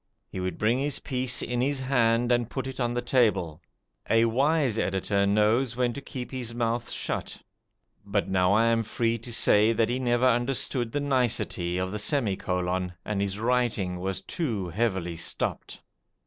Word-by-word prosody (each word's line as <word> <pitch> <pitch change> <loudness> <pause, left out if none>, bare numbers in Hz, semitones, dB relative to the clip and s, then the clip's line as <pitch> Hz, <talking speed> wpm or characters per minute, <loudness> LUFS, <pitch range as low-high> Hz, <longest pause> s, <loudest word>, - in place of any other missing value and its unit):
He - - -5
would 90 -2 -3
bring 115 +4 +1
his 145 +1 -1
piece 130 -2 -1
in 120 0 -1
his 140 +1 0
hand 120 -2 +2
and 120 -1 +1
put 135 -2 -4
it 130 0 -7
on 120 -1 0
the 120 - -1
table. 105 - +1 0.5
A 115 0 +4
wise 135 0 +2
editor 100 +1 0
knows 110 +4 +2
when 125 -1 +1
to 140 - -7
keep 125 -2 -7
his 120 -3 -5
mouth 120 0 -1
shut; - - -4 0.6
but 100 0 -1
now 95 -1 +2
I 110 +3 +4
am 115 0 +3
free 115 +1 -1
to 120 +2 -10
say 110 -1 +4
that 115 0 +1
he 125 +2 -1
never 120 0 +1
understood 120 -1 +1
the 145 - -1
nicety 120 -10 0
of 95 0 -2
the 105 - -4
semi 115 -3 +1
colon, 90 0 -2
and 100 -1 -1
his 100 0 -2
writing 110 -6 0
was 95 +1 -3
too 110 - -3
heavily 95 -4 -1
stopped. 85 - -3
115 Hz, 175 wpm, -27 LUFS, 100-125 Hz, 0.6 s, A